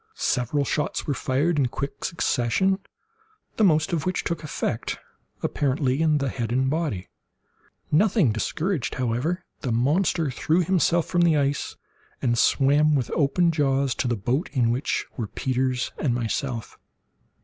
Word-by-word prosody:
Several 135 +4 0
shots 150 +2 -1
were 145 - 0
fired 145 +5 0
in 135 - +3
quick 140 +3 -5
succession, 170 +6 +1 0.8
the 220 - +3
most 155 -4 +3
of 160 - 0
which 185 0 -1
took 170 -2 -3
effect, 125 -6 -3 0.5
apparently, 135 0 0
in 155 -2 +3
the 140 -2 -1
head 120 -2 -3
and 130 +2 +1
body. 150 - -2 0.8
Nothing 185 - +3
discouraged, 155 - -2
however, 130 +9 -1
the 130 - -3
monster 150 +5 +1
threw 165 +7 +1
himself 175 -1 +2
from 175 - +1
the 165 -3 +4
ice, 140 0 -1 0.4
and 120 -2 +1
swam 145 +5 +3
with 130 -4 -1
open 165 +4 +2
jaws, 140 -4 +1
to 130 - -2
the 120 - +1
boat 125 - -1
in 120 -4 +2
which 125 +4 -1
were 115 -4 -2
Peters 130 +1 -1
and 125 -5 +1
myself. 120 0 -3
140 Hz, 150 wpm, -25 LUFS, 125-165 Hz, 0.8 s, the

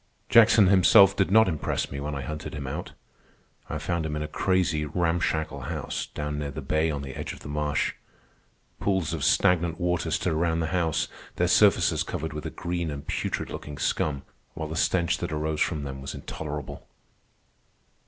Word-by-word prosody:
Jackson 110 -2 +7
himself 95 +1 +6
did 95 -2 +1
not 110 +2 +6
impress 80 -4 -2
me 70 - -4
when 75 +1 -4
I 70 - -4
hunted 75 +4 -6
him 70 -2 -5
out. 65 - -5 0.8
I 75 - -2
found 80 +2 -2
him 75 -1 -3
in 75 - -2
a - - -4
crazy, 85 -2 +1
ramshackle 80 -1 -1
house 75 +3 -4
down 75 0 -4
near 75 -1 -3
the 70 +1 -7
bay 80 +4 +1
on 70 -2 -3
the 65 -1 -7
edge - - -5
of - - -13
the - - -9
marsh. 75 0 -1 0.9
Pools 95 -5 0
of - - -3
stagnant 85 -1 +3
water 90 -2 0
stood 80 +2 0
around 80 +1 +1
the 80 - 0
house, 85 -3 +1 0.3
their - - +1
surfaces - - +4
covered 80 0 -4
with 75 - -5
a - - -3
green 85 -1 -3
and 70 -1 -6
putrid - - -3
looking 75 -1 -7
scum, 70 -3 -1 0.3
while 80 - -4
the 80 - -4
stench 85 -1 +1
that - - -3
arose 75 0 -2
from 75 -4 0
them 65 -1 -6
was 70 - -6
intolerable. 75 -3 -6
80 Hz, 185 wpm, -26 LUFS, 75-85 Hz, 0.9 s, Jackson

